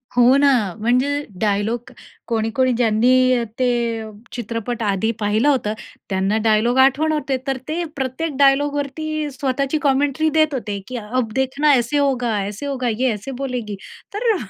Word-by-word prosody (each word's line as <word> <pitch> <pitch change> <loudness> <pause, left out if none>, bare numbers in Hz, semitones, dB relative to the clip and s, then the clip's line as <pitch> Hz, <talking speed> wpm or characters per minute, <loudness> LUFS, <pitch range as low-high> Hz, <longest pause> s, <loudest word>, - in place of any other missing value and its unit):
हो 245 +2 +6
ना, 280 0 +5 0.3
म्हणजे 250 +5 +2 0.3
डायलॉग 215 +3 -1 0.4
कोणी-कोणी 230 +3 +1
ज्यांनी 230 +1 +3 0.2
अ, 240 -2 +1 0.2
ते 235 -3 0 0.3
चित्रपट 235 0 -4
आधी 205 +2 +1
पाहिलं 215 +4 +1
होतं, 250 -7 +1 0.4
त्यांना 195 +2 +1
डायलॉग 220 +3 +3
आठवण 275 +4 +4
होते, 295 -3 -1
तर 270 -1 0
ते 330 +3 -2
प्रत्येक 275 +3 -3
डायलॉगवरती 290 +2 +1
स्वतःची 275 +2 -1
कॉमेंट्री 285 +2 +2
देत 310 -1 +2
होते. 210 -6 -3
की 255 - -6
"अब 230 +1 -2
देखना 265 +3 +2
ऐसे 245 +2 +1
होगा, 250 -6 +1
ऐसे 210 +7 -6
होगा, 265 -3 -2
ये 245 +3 +1
ऐसे 215 +6 -7
बोलेगी." 245 -6 -3 0.4
तर, 445 +1 +1
255 Hz, 145 wpm, -20 LUFS, 225-280 Hz, 0.4 s, हो